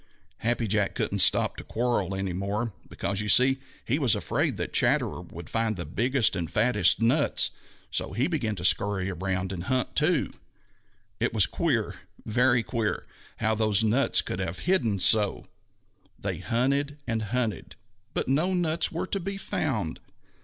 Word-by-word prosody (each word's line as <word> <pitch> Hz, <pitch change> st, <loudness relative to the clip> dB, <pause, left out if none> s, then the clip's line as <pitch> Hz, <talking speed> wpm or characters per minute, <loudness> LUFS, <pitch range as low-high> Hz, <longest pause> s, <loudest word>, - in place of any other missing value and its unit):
Happy 115 Hz, 0 st, 0 dB
Jack 105 Hz, -1 st, 0 dB
couldn't 100 Hz, -, -1 dB
stop 90 Hz, -, +4 dB
to -, -, -8 dB
quarrel 110 Hz, -5 st, -1 dB
any 95 Hz, -1 st, -3 dB
more, 100 Hz, +5 st, -2 dB, 0.2 s
because 100 Hz, +1 st, -2 dB
you 105 Hz, -, -3 dB
see 130 Hz, +4 st, +5 dB, 0.3 s
he 135 Hz, +6 st, 0 dB
was 130 Hz, -7 st, +3 dB
afraid -, -, -1 dB
that -, -, -4 dB
Chatterer -, -, +2 dB
would 85 Hz, -1 st, -10 dB
find 115 Hz, +1 st, -1 dB
the 85 Hz, -, -4 dB
biggest 120 Hz, -, +1 dB
and 85 Hz, -3 st, -3 dB
fattest 105 Hz, -5 st, +3 dB
nuts, 115 Hz, +1 st, +2 dB, 0.4 s
so -, -, -2 dB
he 130 Hz, +5 st, +1 dB
began 125 Hz, -11 st, -1 dB
to 90 Hz, -2 st, -5 dB
scurry 100 Hz, -1 st, +1 dB
around 95 Hz, +1 st, -2 dB
and 90 Hz, -2 st, -5 dB
hunt 130 Hz, -1 st, -1 dB
too. -, -, +2 dB, 0.9 s
It -, -, -1 dB
was -, -, +6 dB
queer, -, -, -1 dB, 0.3 s
very 120 Hz, +1 st, +3 dB
queer, 115 Hz, -3 st, -2 dB, 0.3 s
how 110 Hz, -1 st, +1 dB
those 110 Hz, -1 st, +2 dB
nuts 120 Hz, +6 st, +2 dB
could 90 Hz, -, -4 dB
have 95 Hz, -2 st, -3 dB
hidden 125 Hz, -, +2 dB
so! 105 Hz, +1 st, +3 dB, 0.7 s
They -, -, -4 dB
hunted 140 Hz, +5 st, 0 dB
and 115 Hz, -1 st, -1 dB
hunted, 110 Hz, -5 st, -2 dB, 0.4 s
but -, -, -1 dB
no 160 Hz, +8 st, +1 dB
nuts 165 Hz, -2 st, +1 dB
were 170 Hz, -, -3 dB
to 195 Hz, -, -2 dB
be 195 Hz, +2 st, -4 dB
found. 115 Hz, -, -2 dB
110 Hz, 160 wpm, -27 LUFS, 95-130 Hz, 0.9 s, was